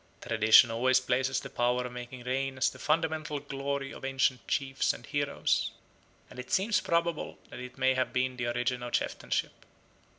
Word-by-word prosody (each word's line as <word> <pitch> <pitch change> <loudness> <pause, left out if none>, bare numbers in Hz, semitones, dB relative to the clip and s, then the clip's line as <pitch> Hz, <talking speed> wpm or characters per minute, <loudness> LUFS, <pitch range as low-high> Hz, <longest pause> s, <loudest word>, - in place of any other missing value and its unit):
Tradition 110 +1 +6
always 130 +3 +3
places 130 +1 0
the - - -8
power 125 +1 +1
of 125 - -6
making 125 0 -8
rain 135 +1 -2
as 130 - +2
the - - -13
fundamental 155 -1 0
glory 140 0 -4
of - - -11
ancient 135 -2 0
chiefs 135 -1 0
and - - -11
heroes, 145 -1 0 0.6
and - - -12
it 125 0 -7
seems 200 +3 +2
probable 170 -1 -1
that - - -8
it 125 +1 -9
may 130 0 +3
have 130 0 0
been 130 0 0
the 125 -1 -3
origin 120 +1 -1
of 120 -1 -6
chieftainship. - - -1
130 Hz, 175 wpm, -30 LUFS, 125-140 Hz, 0.6 s, Tradition